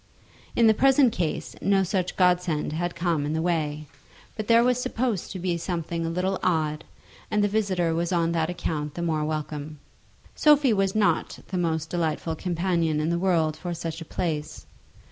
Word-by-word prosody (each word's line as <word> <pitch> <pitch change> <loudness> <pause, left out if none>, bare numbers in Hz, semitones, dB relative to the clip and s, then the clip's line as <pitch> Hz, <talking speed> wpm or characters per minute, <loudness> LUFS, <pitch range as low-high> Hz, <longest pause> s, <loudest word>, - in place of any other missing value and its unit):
In 235 - +4
the 220 - +7
present 270 0 +4
case 170 -4 -3
no 195 -1 +3
such 185 -1 -1
godsend 180 -5 +1
had 175 +2 -2
come 170 -4 0
in 150 +1 -2
the 160 - 0
way, 155 -3 -1 0.5
but 215 -2 -5
there 230 0 +6
was 250 0 +2
supposed 235 -6 -2
to 195 - -6
be 180 -1 -1
a 170 - -3
something 165 -1 -3
a - - -1
little 185 +3 -1
odd, 155 -4 0 0.5
and 210 -1 +1
the - - +4
visitor 190 -5 0
was 170 +2 -1
on 170 -2 +1
that 165 -1 0
account 150 -4 -3
the 170 - -3
more 160 -2 0
welcome. 150 -1 -4 0.6
Sophie 295 -5 +4
was 195 -1 +1
not 215 -1 +1
the 185 - -2
most 160 -2 -1
delightful 165 -1 -1
companion 170 -2 0
in 155 +2 0
the 170 - 0
world 165 -4 +2
for 175 0 -5
such 165 0 -5
a - - -6
place. 155 -2 -4
170 Hz, 185 wpm, -25 LUFS, 160-190 Hz, 0.6 s, the